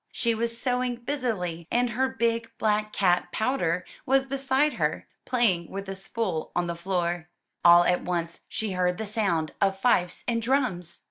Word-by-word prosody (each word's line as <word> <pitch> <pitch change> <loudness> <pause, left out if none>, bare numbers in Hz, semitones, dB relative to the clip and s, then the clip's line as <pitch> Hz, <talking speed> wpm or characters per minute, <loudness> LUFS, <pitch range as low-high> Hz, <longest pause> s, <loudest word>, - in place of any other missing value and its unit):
She 235 -2 0
was 230 +1 -1
sewing 250 -1 0
busily 225 - -3
and 245 0 +1
her 260 +3 +1
big 230 -1 0
black 215 0 +1
cat. 180 -3 +2
Powder, 180 -8 0 0.2
was 270 +1 +3
beside 275 +2 +1
her, - - 0 0.2
playing 200 -9 +1
with 195 0 -6
a 195 - -3
spool 195 -3 -3
on 175 - +1
the 170 - -2
floor. 175 -1 -2 0.3
All 175 0 +8
at 180 0 +2
once 170 -1 -3
she 220 -2 -3
heard 180 -1 +1
the 220 - -3
sound 195 -8 0
of 195 -1 +2
fifes 180 -6 +2
and 230 -1 +1
drums. 230 - 0
210 Hz, 165 wpm, -27 LUFS, 175-240 Hz, 0.3 s, All